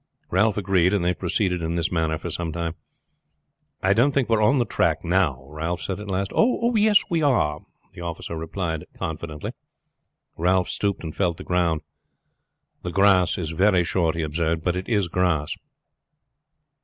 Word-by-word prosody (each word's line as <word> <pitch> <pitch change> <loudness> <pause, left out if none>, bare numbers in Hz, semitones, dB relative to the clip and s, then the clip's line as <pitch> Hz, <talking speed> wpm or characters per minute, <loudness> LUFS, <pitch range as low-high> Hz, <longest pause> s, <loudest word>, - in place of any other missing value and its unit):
Ralph 105 +3 +2
agreed, 95 -1 +2
and 90 -4 0
they 90 - +2
proceeded 90 0 -1
in 80 +1 -2
this 85 -1 -1
manner 80 -2 0
for 85 - -6
some 85 -2 -3
time. 85 0 -3 1.1
"I 95 +1 +4
don't 125 +7 +3
think 130 -4 +1
we 115 - +4
are - - 0
on 135 +7 +4
the 120 - +2
track - - 0
now," 85 -8 +1
Ralph 80 +4 -3
said 95 0 -3
at 105 - -8
last. 95 0 -1
"Oh, 235 0 +2
yes, 210 -1 +5
we 165 -2 +2
are," 120 - +2 0.3
the - - -10
officer 85 0 -5
replied 80 0 -3
confidently. 75 -1 -5 0.9
Ralph 90 +2 +2
stooped 100 -3 -1
and 80 -2 -6
felt 85 -4 0
the - - -8
ground. 85 -3 +1 1.0
"The 90 - -4
grass 95 -1 +4
is 80 -4 -3
very 90 +1 +3
short," 85 -1 0
he 85 - -1
observed, 80 +1 -1
"but 90 0 0
it 90 +1 -4
is 105 -6 +2
grass." 85 -4 0
90 Hz, 175 wpm, -24 LUFS, 80-100 Hz, 1.1 s, yes